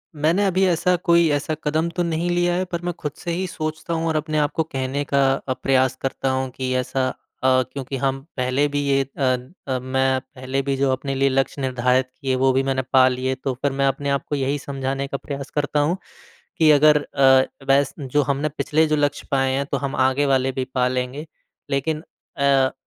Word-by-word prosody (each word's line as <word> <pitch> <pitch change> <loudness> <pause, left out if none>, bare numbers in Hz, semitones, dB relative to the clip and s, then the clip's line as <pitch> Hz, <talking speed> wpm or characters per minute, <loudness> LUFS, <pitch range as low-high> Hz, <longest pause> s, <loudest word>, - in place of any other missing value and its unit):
मैंने 165 +7 +2
अभी 190 0 +2
ऐसा 180 +1 +2
कोई 170 -1 +5
ऐसा 145 +2 -1
कदम 160 +3 0
तो 175 - +1
नहीं 170 +1 -1
लिया 175 0 +2
है 185 - 0
पर 175 -1 -4
मैं 175 0 -2
खुद 150 - -3
से 175 - -4
ही 185 +3 -1
सोचता 155 0 -4
हूँ 165 0 -1
और 160 - 0
अपने 155 0 -1
आप 150 0 +1
को 160 - +2
कहने 135 -1 -3
का 140 - +1 0.2
अ, 135 -1 -3
प्रयास 130 0 +1
करता 135 0 -2
हूँ 130 0 -1
कि 130 0 -3
ऐसा 130 +1 0 0.4
अ, 130 0 +4
क्योंकि 135 -1 -4
हम 135 +1 -1 0.2
पहले 130 +3 +1
भी 145 0 -2
ये 135 0 +3
अ 130 -2 +2 0.4
अ, - - -1
मैं 130 +1 +1
पहले 130 +1 -4
भी 135 0 -1
जो 135 0 +2
अपने 135 +1 -2
लिए 135 +1 +2
लक्ष्य 135 +1 0
निर्धारित 130 0 +1
किए 135 -2 0
वो 130 +1 +3
भी 135 +1 +2
मैंने 135 -1 0
पा 130 -1 +7
लिए 130 +1 -1
तो 135 - 0
फिर 140 - +1
मैं 135 0 +1
अपने 140 +1 -1
आप 140 0 0
को 145 - 0
यही 140 +1 0
समझाने 135 0 -3
का 140 - -3
प्रयास 140 0 -6
करता 145 0 0
हूँ, 155 +5 +1 0.6
कि 160 -1 +5
अगर 150 0 +5
अ, 135 -2 +4 0.3
वैस 140 0 +2
जो 140 +1 +1
हमने 140 +3 -1
पिछले 150 +2 +1
जो 155 - +2
लक्ष्य 145 -1 -1
पाए 135 -1 +2
हैं 140 +1 0
तो - - +1
हम 140 0 -3
आगे 130 +2 +2
वाले 135 -1 +2
भी 130 0 -3
पा 125 -1 +3
लेंगे। 130 +4 -3 0.4
लेकिन 150 +3 -1 0.3
अ 140 - -1
अ, 135 -1 +3
140 Hz, 220 wpm, -22 LUFS, 130-150 Hz, 0.6 s, पा